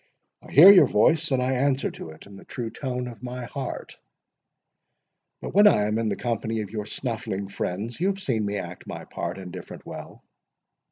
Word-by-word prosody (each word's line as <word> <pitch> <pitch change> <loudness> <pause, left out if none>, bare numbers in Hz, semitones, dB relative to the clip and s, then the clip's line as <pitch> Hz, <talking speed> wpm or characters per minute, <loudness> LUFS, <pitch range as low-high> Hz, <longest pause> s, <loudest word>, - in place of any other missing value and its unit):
I - - -15
hear 170 +8 +10
your 195 - +7
voice, 165 0 +3
and 130 -2 +1
I 130 - 0
answer 135 +1 +1
to - - -9
it 80 - -13
in 100 - -13
the 100 - -12
true 115 -3 -5
tone 125 -1 -4
of 115 -4 -10
my 125 0 -6
heart; 135 +2 -6 1.4
but - - -5
when 205 +2 +7
I 105 - +5
am 105 +1 0
in 115 -1 0
the - - -1
company 115 -2 -2
of 100 -2 -7
your 105 -1 -4
snuffling 110 -5 -4
friends, 100 - -4
you 180 - +1
have 195 0 -1
seen 125 - -1
me 100 0 -2
act 90 -2 -7
my - - -7
part 85 +2 -5
indifferent 90 -1 -9
well." - - -9
115 Hz, 200 wpm, -25 LUFS, 100-135 Hz, 1.4 s, hear